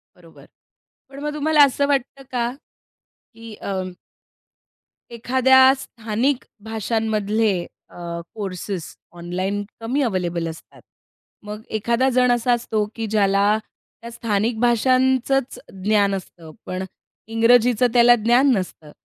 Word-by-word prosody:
बरोबर. 170 -2 -18 0.6
पण 275 0 -11
मग 300 0 -3
तुम्हाला 300 0 +4
असं 280 +1 0
वाटतं 275 -1 -1
का 240 -1 -1 0.8
की 225 -1 -11
अं, 190 -3 -4 1.2
एखाद्या 260 +3 +3 0.2
स्थानिक 240 +2 -2 0.2
भाषांमधले 220 -1 -1 0.4
अ, - - -16 0.4
कोर्सेस 190 -4 -5 0.2
ऑनलाईन 185 +4 -3 0.2
कमी 250 +6 -1
अवेलेबल 175 -8 -1
असतात. 160 - -13 0.6
मग 210 +1 -7 0.2
एखादा 235 +4 +1
जण 250 -1 +3
असा 245 +1 +2
असतो, 220 -3 -1
की 225 - -3
ज्याला 200 0 +2 0.4
त्या 235 0 -9
स्थानिक 225 -1 -1
भाषांचंच 255 +2 +2 0.2
ज्ञान 200 -1 +2
असतं, 170 -4 -10
पण 185 +1 -4 0.4
इंग्रजीचं 230 +1 +4
त्याला 240 0 +6
ज्ञान 245 +4 +4
नसतं. 175 -5 -6
225 Hz, 110 wpm, -21 LUFS, 200-250 Hz, 1.2 s, त्याला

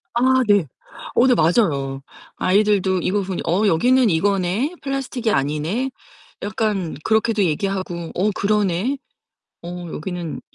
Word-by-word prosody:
아 260 +1 +4
네. 205 -5 +4 0.5
어 245 - +5
네 250 - +5
맞아요. 145 - +1 0.4
아이들도 195 -1 +2
이거 200 +1 0
보니 185 -1 -4
"어 190 +6 +2
여기는 245 +7 +4
이거네. 200 - 0
플라스틱이 265 -4 -2
아니네." 155 - -1 0.5
약간 205 -5 -1
그렇게도 220 -1 +2
얘기하고 175 0 -2
"어 200 +4 +2
그러네. 210 +5 +1 0.7
어 175 0 -7
여기는 175 0 -5
195 Hz, 275 characters per minute, -21 LUFS, 175-220 Hz, 0.7 s, 어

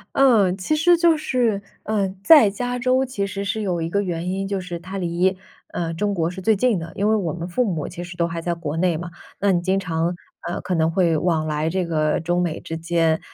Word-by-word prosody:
呃， 230 -9 +5
其 195 +11 -1
实 345 +3 +4
就 335 -1 +4
是， 245 -8 0 0.2
呃， 205 -3 0 0.2
在 300 -10 +8
加 245 +4 -3
州 255 +2 +2
其 225 -6 -3
实 200 +1 -4
是 210 +2 -2
有 185 -5 -1
一 165 - -3
个 200 +3 +1
原 175 -2 -3
因， 195 +1 -2
就 195 -1 -2
是 180 -2 -6
它 185 +3 -8
离， 180 +1 +1 0.4
呃， 165 -1 -2
中 205 +4 -1
国 165 -2 0
是 185 +1 -7
最 220 +3 +3
近 230 -1 +2
的。 165 0 -7
因 205 +2 +1
为 220 - +4
我 175 -7 -1
们 170 +1 -5
父 245 +8 +1
母 170 -9 -2
其 175 - -7
实 175 0 -8
都 170 - +1
还 165 0 -4
在 170 +1 -1
国 160 -2 -4
内 175 -1 +2
嘛， 175 +2 -6 0.3
那 200 -1 +2
你 175 - +2
经 190 +2 +1
常， 170 -2 -1 0.3
呃， 175 - -3
可 180 - -2
能 160 0 +2
会 170 -2 +2
往 160 -1 0
来 155 +1 -1
这 185 +2 -1
个 155 -2 0
中 175 +2 0
美 170 -2 -2
之 165 - -6
间， 165 -1 +1
180 Hz, 260 characters per minute, -22 LUFS, 170-205 Hz, 0.4 s, 在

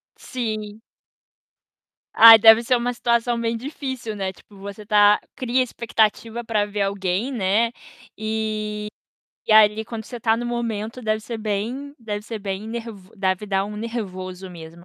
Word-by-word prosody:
Sim. 215 -3 -5 1.3
Ai, 225 0 +10
deve 225 +2 +7
ser 250 - +2
uma 245 +1 -2
situação 235 0 0
bem 230 0 -1
difícil, 260 -4 -6
né, 190 -2 -3
tipo 200 +2 -19
você 200 +1 -9
tá 210 -1 +5 0.2
cria 255 0 0
expectativa 230 0 -1
para 215 -2 0
ver 205 0 -4
alguém, 195 +5 -1
né, 225 +1 +1 0.5
e 215 -1 -3 0.6
e - - +4
ali 215 0 +5
quando 225 -1 -7
você 245 - -8
tá 225 0 +2
no 240 - -4
momento 230 -1 -3
deve 215 -2 -1
ser 225 +1 -6
bem 225 +7 -4
deve 210 -3 -5
ser 225 0 -6
bem 195 +1 -5
ner 235 0 -5 0.3
deve 190 +1 -1
dar 195 0 0
um 210 +1 -7
nervoso 190 -5 -6
mesmo. 170 0 -12
220 Hz, 155 wpm, -22 LUFS, 205-235 Hz, 1.3 s, Ai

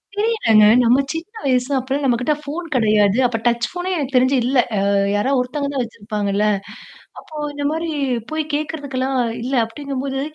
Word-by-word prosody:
தெரியலங்க. 415 - +3 0.2
நம்ம 240 +3 +4
சின்ன 330 +7 -6
வயசு 255 0 +1
அப்பலாம் 265 +2 -2
நம்மக்கிட்ட 250 +3 +1
ஃபோன் 320 +4 -5
கிடையாது. 215 -3 +3
அப்ப 240 -2 0
டச் 235 0 +2
ஃபோனே 355 +1 -4
எனக்கு 275 -3 -3
தெரிஞ்சு 255 +2 +4
இல்ல. 255 +2 +2 0.2
அ - - +2 0.4
யாரா 210 +7 +1
ஒருத்தவங்க 280 +3 -2
தான் 265 -3 0
வச்சிருப்பாங்கல்ல. 210 -2 -2 0.7
அப்போ 310 - -14 0.2
இந்தமாரி 305 +3 -2 0.4
போய் 315 0 -1
கேட்கிறதுக்கெல்லாம் 280 -3 -2 0.2
இல்ல, 255 +3 -4
அப்பிடிங்கம்போது 270 +3 -4
265 Hz, 145 wpm, -20 LUFS, 235-290 Hz, 0.7 s, நம்ம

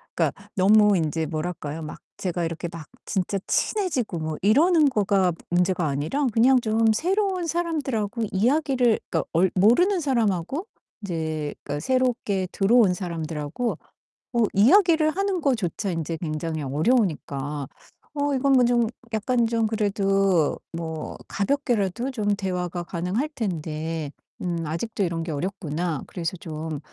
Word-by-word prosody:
그러니까 - - +1 0.2
너무 210 +2 +5
인제 160 -1 -1
뭐랄까요? 155 -1 -4
막 155 -1 -7 0.2
제가 175 -2 -2
이렇게 165 +1 -4
막 165 -3 -8 0.2
진짜 190 +1 -1
친해지고 275 - 0
뭐 155 -1 -3
이러는 305 - +5
거가 200 -5 +2 0.2
문제가 180 -1 +1
아니라 150 - 0
그냥 250 +4 +5
좀 220 0 +2
새로운 370 - 0
사람들하고 270 -10 -1
이야기를 250 +2 +2
그러니까 - - 0
얼 180 +3 +4
모르는 295 - +4
사람하고 240 - 0 0.4
이제 160 -5 -3
그러니까 145 0 -3
새롭게 235 - 0
들어온 205 -1 +4
사람들하고 165 +3 -3 0.6
어 235 - +1
이야기를 315 - +5
하는 385 +1 -1
것조차 220 - 0
인제 165 -1 -3
굉장히 155 -1 -3
어려우니까 145 - 0 0.5
'어 285 0 0
이건 275 +1 +2
뭐 255 -2 +5
좀 240 -1 +3 0.3
약간 235 +2 +1
좀 225 -1 +1
그래도 195 -6 +1 0.2
뭐 160 -2 -5
가볍게라도 240 -1 0
좀 205 -4 0
대화가 180 -3 -3
가능할 180 - -2
텐데, 160 - -3 0.3
음 170 -2 -2
아직도 200 +8 -2
이런 170 -2 -1
게 165 - -4
어렵구나.' 165 -1 -3
그래서 170 -1 -4
좀 155 -2 -5
195 Hz, 315 characters per minute, -24 LUFS, 165-245 Hz, 0.6 s, 너무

